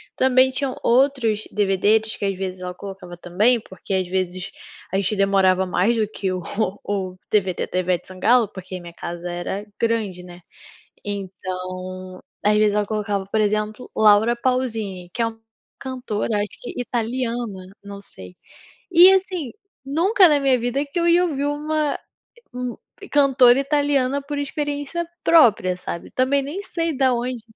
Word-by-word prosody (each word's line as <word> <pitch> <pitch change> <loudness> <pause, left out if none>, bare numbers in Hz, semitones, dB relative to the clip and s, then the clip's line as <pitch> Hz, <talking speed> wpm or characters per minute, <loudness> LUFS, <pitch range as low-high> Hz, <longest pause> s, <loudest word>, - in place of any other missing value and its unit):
também 260 0 +4
tinham 260 0 -2
outros 240 -4 +2
DVDs 210 +2 +2
que - - -3
às 195 -1 0
vezes 185 -1 -5
ela 180 0 -4
colocava 190 -2 -9
também, 205 +8 +2
porque 195 -1 -8
às 185 -1 0
vezes 185 0 -3 0.4
a - - -2
gente 200 +2 0
demorava 190 -1 +3
mais 200 +6 +2
do 215 -2 +1
que 195 -3 -3
o 185 - -3 0.4
o 190 -2 -3 0.2
DVD 190 -4 +1
da - - -4
Ivete 180 -1 -1
Sangalo, 220 +5 +3
porque 185 -2 -8
minha 170 -1 -10
casa 175 +1 -6
era 175 +3 -4 0.2
grande, 215 -6 -1
né. 175 0 -12 0.6
Então 185 -1 -6 0.2
às 210 +1 +4
vezes 210 -1 +3
ela 210 - +1
colocava, 205 -2 -2
por 220 +2 0
exemplo, 215 +2 -1
Laura 220 +2 +5
Pausini, 225 -8 -2
que 240 - -6
é - - +2
uma 225 0 -7 0.4
cantora 245 -5 -3
acho 205 0 -1
que 245 - -6
italiana, 235 -4 -3 0.2
não 200 0 -8
sei. 90 - -12 0.5
E 355 +2 +8
assim, 370 - -1 0.3
nunca 360 - +4
na 295 -2 +3
minha 270 -2 +3
vida 245 +4 -1
que 295 +5 -5
eu 340 - +1
ia 345 +1 +5
ouvir 285 -5 -2
uma 300 0 -1
é - - -6 0.6
um 250 -1 -4 0.3
cantora 265 -3 +5
italiana 280 -1 +1
por 290 0 -5
experiência 290 +3 -3 0.2
própria, 215 - +5
sabe? 170 -1 -7
Também 270 +2 +2
nem 305 +9 -5
sei 330 -5 -2
da 260 -1 +3
onde 245 0 -3
220 Hz, 160 wpm, -22 LUFS, 190-265 Hz, 0.6 s, E